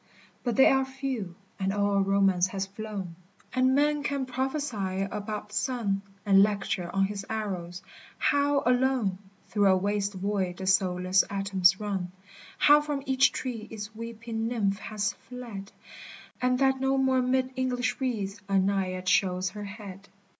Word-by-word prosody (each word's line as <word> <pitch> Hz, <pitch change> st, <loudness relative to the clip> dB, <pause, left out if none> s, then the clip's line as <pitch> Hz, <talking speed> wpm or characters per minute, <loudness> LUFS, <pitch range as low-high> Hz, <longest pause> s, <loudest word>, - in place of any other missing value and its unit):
But 240 Hz, -3 st, -1 dB
they 265 Hz, -, +7 dB
are 265 Hz, 0 st, +5 dB
few, 265 Hz, -9 st, -4 dB, 0.2 s
and 190 Hz, 0 st, 0 dB
all 200 Hz, 0 st, +1 dB
romance 195 Hz, -2 st, +3 dB
has 195 Hz, 0 st, -3 dB
flown, 200 Hz, -3 st, -6 dB, 0.4 s
And 255 Hz, +1 st, +3 dB
men 295 Hz, +1 st, +2 dB
can 280 Hz, -2 st, -1 dB
prophesy 255 Hz, -8 st, -2 dB
about 210 Hz, +1 st, -5 dB
the -, -, -15 dB
sun, 220 Hz, -6 st, 0 dB, 0.2 s
And 195 Hz, -1 st, +6 dB
lecture 200 Hz, -3 st, 0 dB
on 195 Hz, 0 st, +2 dB
his 200 Hz, 0 st, -4 dB
arrows 185 Hz, -5 st, -4 dB, 0.2 s
— -, -, -22 dB
how, 285 Hz, -1 st, +2 dB
alone, 250 Hz, -6 st, +2 dB, 0.3 s
Through 205 Hz, -2 st, +3 dB
a 190 Hz, -1 st, +5 dB
waste 200 Hz, +1 st, -1 dB
void 190 Hz, -2 st, -1 dB
the 190 Hz, -, -5 dB
soulless 185 Hz, -1 st, +3 dB
atoms 195 Hz, -1 st, +3 dB
run, 195 Hz, -4 st, -3 dB, 0.5 s
How 295 Hz, 0 st, +6 dB
from 295 Hz, -2 st, -3 dB
each 265 Hz, 0 st, +4 dB
tree 230 Hz, -4 st, -5 dB
its 220 Hz, 0 st, -7 dB
weeping 225 Hz, 0 st, -4 dB
nymph 205 Hz, -4 st, 0 dB
has 215 Hz, -1 st, -2 dB, 0.2 s
(led, 230 Hz, -6 st, -7 dB, 0.7 s
And 250 Hz, 0 st, +2 dB
that 265 Hz, 0 st, +2 dB
no 270 Hz, 0 st, +2 dB
more 265 Hz, -1 st, +3 dB
'mid 255 Hz, +1 st, +1 dB
English 255 Hz, -1 st, -1 dB
reeds 210 Hz, -6 st, -2 dB
a 195 Hz, -, +3 dB
Naiad 185 Hz, -1 st, 0 dB
shows 185 Hz, 0 st, +2 dB
her 210 Hz, -1 st, -7 dB
head. 200 Hz, -2 st, -10 dB
210 Hz, 155 wpm, -28 LUFS, 195-255 Hz, 0.7 s, they